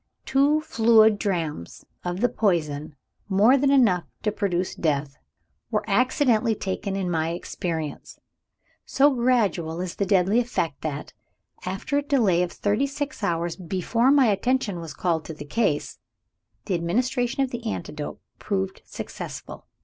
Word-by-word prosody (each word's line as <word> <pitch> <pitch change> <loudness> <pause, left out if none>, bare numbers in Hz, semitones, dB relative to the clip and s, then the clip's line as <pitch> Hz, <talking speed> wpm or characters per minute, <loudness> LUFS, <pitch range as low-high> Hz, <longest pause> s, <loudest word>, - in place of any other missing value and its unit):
Two 285 +3 +3
fluid 220 -7 +4
drachms 165 - -3 0.2
of 175 +2 -3
the 245 - +5
poison 155 -10 -1 0.3
(more 210 +7 +5
than 275 0 +2
enough 225 -11 +4 0.2
to 210 - +1
produce 185 -3 -1
death) 145 -3 -1 0.5
were 210 - -1
accidentally 235 0 +2
taken 195 0 -3
in 195 -2 -2
my 165 -2 0
experience. 165 -2 -5 0.6
So 280 +1 +3
gradual 215 -10 +1
is 180 -1 -4
the 200 - 0
deadly 195 +3 +3
effect 170 - -2
that, 150 -2 -5 0.5
after 195 +10 -1
a - - -1
delay 235 -12 +2
of 180 -1 -1
thirty 210 +7 0
six 280 -1 -5
hours 170 -3 -1
before 190 +7 0
my 280 -2 +6
attention 215 -2 +1
was 165 -3 -8
called 165 -3 0
to 160 - -7
the 145 - -8
case, 155 -2 -1 0.7
the 195 - -1
administration 245 +9 0
of 260 - -3
the 240 -1 -5
antidote 150 -2 -6 0.2
proved 190 -2 -2
successful. - - -8
195 Hz, 140 wpm, -25 LUFS, 170-245 Hz, 0.7 s, my